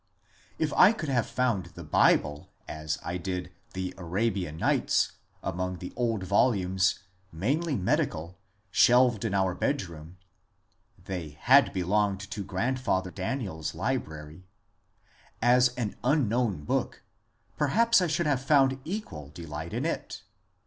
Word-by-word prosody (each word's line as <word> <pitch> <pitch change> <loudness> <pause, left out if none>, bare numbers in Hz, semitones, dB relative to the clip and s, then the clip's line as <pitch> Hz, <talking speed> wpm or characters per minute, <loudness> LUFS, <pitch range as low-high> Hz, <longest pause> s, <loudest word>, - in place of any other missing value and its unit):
If 155 -2 -1
I 205 - +7
could 165 -10 -5
have 125 -4 +1
found 120 -8 0
the 85 - -8
Bible, 75 -1 +2 0.2
as 75 +1 -3
I 90 - -2
did 90 0 -4 0.2
the 95 -1 -3
" - - -25
Arabian 95 -2 -2
Nights," - - +2 0.3
among 90 0 -3
the 90 +1 -8
old 115 -5 -1
volumes, 95 -2 +2 0.3
mainly 140 - -1
medical, 95 - -1 0.3
shelved 120 -1 +5
in 105 -3 -1
our 95 -2 +2
bedroom 85 - -3 0.9
(they 85 -6 -6
had 135 +3 +6
belonged 100 +1 0
to 105 - -4
grandfather 95 -1 -1
DaniePs 95 - -4
library), 90 -7 -4 0.9
as 125 +1 +5
an 115 -5 -3
unknown 120 - +1
book, - - -2 0.5
perhaps 230 +9 +3
I 180 - +2
should 165 +2 0
have 140 -4 +1
found 135 -1 +3
equal 160 - -6
delight 75 -1 -7
in - - -2
it. - - -4
100 Hz, 130 wpm, -28 LUFS, 90-130 Hz, 0.9 s, I